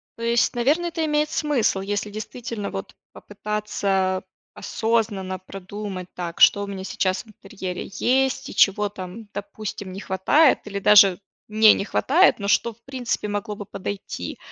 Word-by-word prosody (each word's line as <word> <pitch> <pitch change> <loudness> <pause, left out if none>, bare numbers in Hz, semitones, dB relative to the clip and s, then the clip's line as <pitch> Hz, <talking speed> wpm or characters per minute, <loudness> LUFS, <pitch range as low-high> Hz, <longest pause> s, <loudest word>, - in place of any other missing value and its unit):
То 230 - -13
есть, 235 +1 +2
наверно, 295 +9 +2
это 330 -1 -2
имеет 300 0 +1
смысл, 280 -10 +1
если 205 +1 -3
действительно, 215 0 -5
вот, 95 0 -7 0.2
попытаться 200 -2 -2 0.3
осознанно 205 -3 -1
продумать, 195 0 -7
так 170 -2 -5
что 205 - +7
у - - -5
меня 195 -1 -6
сейчас 185 +1 -1
в - - -28
интерьере 190 -3 -7
есть 265 +4 +1
и - - -9
чего 205 +1 +4
там, 195 +2 -8
допустим, 205 -1 -6
не 190 - -7
хватает 215 - +3
или 200 -1 -4
даже 200 -2 +6 0.3
не 215 0 +6
не 195 - -2
хватает, 330 +8 +3
но 200 - -3
что 235 +2 +2
в 230 - -32
принципе 255 -5 -3
могло 205 +1 -3
бы 205 - -8
подойти. 195 +1 -6
205 Hz, 155 wpm, -23 LUFS, 195-235 Hz, 0.3 s, что